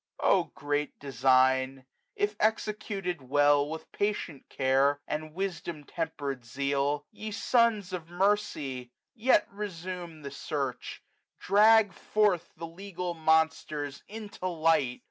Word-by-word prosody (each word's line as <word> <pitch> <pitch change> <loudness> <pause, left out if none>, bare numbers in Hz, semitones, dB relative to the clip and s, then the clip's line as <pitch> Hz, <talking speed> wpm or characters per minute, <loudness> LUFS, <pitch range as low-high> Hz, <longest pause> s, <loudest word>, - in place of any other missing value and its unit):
375 - - +4
O - - -31
great 145 +1 -2
design! 130 -1 +2 0.3
if 410 0 0
executed 205 -5 -1
well. 145 +2 +3
With 160 0 -7
patient 200 -8 -3
care, 135 +2 +2
and 155 +1 -4
wisdom 175 -5 -4
temper'd 145 -5 -4
zeal. 140 +4 -1
Ye 215 - -7
sons 220 -4 +2
of 170 -2 -5
mercy! 175 -10 0 0.2
yet 250 +2 +3
resume 180 -5 -6
the 140 - -6
search; 135 -2 -4 0.3
Drag 210 +1 +5
forth 210 -5 +1
the 165 - -5
legal 180 +1 -5
monsters 160 -3 +1
into 210 -3 -6
light. 160 -7 +2
160 Hz, 115 wpm, -29 LUFS, 140-195 Hz, 0.3 s, Drag